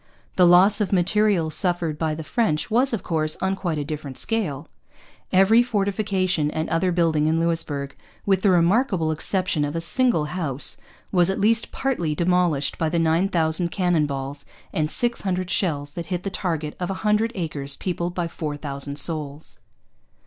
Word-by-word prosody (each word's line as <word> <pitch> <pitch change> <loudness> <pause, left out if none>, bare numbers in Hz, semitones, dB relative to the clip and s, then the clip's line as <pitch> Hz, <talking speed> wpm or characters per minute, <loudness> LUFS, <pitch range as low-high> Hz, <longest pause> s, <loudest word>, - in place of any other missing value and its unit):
The 180 -1 +5
loss 190 +5 +6
of 205 - -1
material 190 -2 +2
suffered 170 -3 0
by 155 -1 -1
the 160 - -6
French 160 -2 -1
was, 250 +4 +3
of 230 - -3
course, 155 -2 -1
on 190 0 0
quite 175 -5 -3
a 145 - -2
different 145 -3 -6
scale. 205 - -2 0.6
Every 195 +5 +5
fortification 195 -7 0
and 155 +1 -3
other 180 +3 +1
building 165 -3 +2
in 160 +1 +2
Louisbourg, 150 -4 -1 0.3
with 195 -2 +2
the 200 - +3
remarkable 180 -1 +2
exception 175 0 0
of 145 +2 -3
a - - 0
single 200 - +2
house, 150 -7 -3 0.4
was 180 -2 +3
at 190 - -1
least 225 +3 +1
partly 175 - -1
demolished 170 -4 +1
by 160 - +1
the 170 - -1
nine 165 +3 +2
thousand 165 0 +1
cannon 175 -5 +1
balls 140 0 -5 0.3
and 155 -1 0
six 240 +7 +1
hundred 185 -2 -2
shells 145 -6 -1
that 170 +1 -7
hit 180 -1 -3
the 195 - -3
target 160 -6 -3
of 180 - -3
a 195 +2 -5
hundred 210 +2 +2
acres 145 -6 -3
peopled 175 0 -3
by 175 -2 -1
four 150 -3 -5
thousand 140 -1 -5
souls. 150 0 -2
170 Hz, 175 wpm, -23 LUFS, 155-190 Hz, 0.6 s, loss